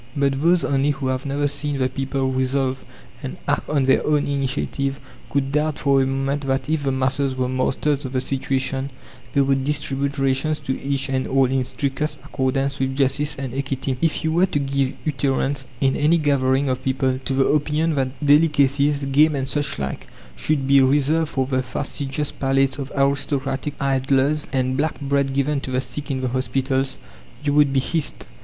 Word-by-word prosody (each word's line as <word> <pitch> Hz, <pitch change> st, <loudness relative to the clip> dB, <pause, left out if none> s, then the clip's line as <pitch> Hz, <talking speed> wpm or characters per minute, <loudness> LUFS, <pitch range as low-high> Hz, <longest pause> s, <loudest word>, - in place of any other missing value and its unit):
But 140 Hz, -1 st, +1 dB
those 170 Hz, +2 st, +4 dB
only 140 Hz, 0 st, +1 dB
who 140 Hz, -1 st, -2 dB
have 130 Hz, +1 st, -2 dB
never 145 Hz, +1 st, 0 dB
seen 145 Hz, 0 st, -1 dB
the 130 Hz, -1 st, +1 dB
people 135 Hz, 0 st, -2 dB
resolve 130 Hz, 0 st, 0 dB, 0.4 s
and 65 Hz, -, -6 dB
act -, -, 0 dB
on 145 Hz, -3 st, +2 dB
their 135 Hz, -, +3 dB
own 150 Hz, -1 st, +2 dB
initiative 140 Hz, 0 st, -1 dB, 0.3 s
could 135 Hz, -1 st, 0 dB
doubt 150 Hz, +1 st, 0 dB
for 140 Hz, -2 st, +3 dB
a 130 Hz, -, +1 dB
moment 135 Hz, +1 st, -1 dB
that 135 Hz, -1 st, 0 dB
if 155 Hz, -1 st, 0 dB
the 135 Hz, -1 st, 0 dB
masses 130 Hz, +1 st, 0 dB
were 130 Hz, -1 st, 0 dB
masters 135 Hz, +3 st, 0 dB
of 130 Hz, -1 st, -6 dB
the 130 Hz, -, +1 dB
situation, 135 Hz, 0 st, -1 dB, 0.4 s
they 140 Hz, -, +4 dB
would 135 Hz, -1 st, +1 dB
distribute 140 Hz, -1 st, -1 dB
rations 135 Hz, +3 st, +1 dB
to 130 Hz, -, -3 dB
each 140 Hz, 0 st, -1 dB
and 130 Hz, -1 st, -1 dB
all 135 Hz, 0 st, +3 dB
in 130 Hz, 0 st, +1 dB
strictest 140 Hz, +4 st, -2 dB
accordance 135 Hz, +1 st, -1 dB
with 130 Hz, 0 st, -1 dB
justice 140 Hz, +2 st, +1 dB
and 135 Hz, -3 st, -5 dB
equity. 135 Hz, -1 st, -2 dB
If 165 Hz, 0 st, +1 dB
you 160 Hz, -, +1 dB
were 175 Hz, +4 st, +3 dB
to 180 Hz, -, -2 dB
give 140 Hz, -1 st, 0 dB
utterance, 135 Hz, -1 st, 0 dB
in 135 Hz, 0 st, +2 dB
any 155 Hz, +3 st, +3 dB
gathering 140 Hz, -2 st, +2 dB
of 130 Hz, 0 st, -2 dB
people, 130 Hz, -1 st, 0 dB
to 135 Hz, -, -2 dB
the 135 Hz, 0 st, +3 dB
opinion 150 Hz, +2 st, +1 dB
that 135 Hz, +1 st, -2 dB
delicacies 145 Hz, -1 st, +3 dB
game 145 Hz, +3 st, +4 dB
and 135 Hz, -1 st, -2 dB
such 145 Hz, +1 st, -2 dB
like 70 Hz, -1 st, -4 dB, 0.3 s
should 150 Hz, -3 st, 0 dB
be 140 Hz, 0 st, +5 dB
reserved 145 Hz, +4 st, +2 dB
for 130 Hz, -1 st, 0 dB
the 130 Hz, 0 st, 0 dB
fastidious 140 Hz, +2 st, -3 dB
palates 135 Hz, 0 st, +1 dB
of 135 Hz, -1 st, -5 dB
aristocratic 140 Hz, 0 st, 0 dB
idlers, 135 Hz, +2 st, +1 dB
and 130 Hz, -1 st, 0 dB
black 155 Hz, +2 st, -1 dB
bread 140 Hz, -1 st, 0 dB
given 140 Hz, +1 st, +1 dB
to -, -, -6 dB
the 130 Hz, 0 st, 0 dB
sick 130 Hz, +4 st, -4 dB
in 130 Hz, -2 st, -1 dB
the 130 Hz, -, -1 dB
hospitals, 130 Hz, +1 st, -1 dB, 0.5 s
you 145 Hz, -1 st, +1 dB
would 145 Hz, -1 st, +4 dB
be 135 Hz, -, +2 dB
hissed. 160 Hz, +3 st, -3 dB
135 Hz, 190 wpm, -22 LUFS, 130-145 Hz, 0.5 s, be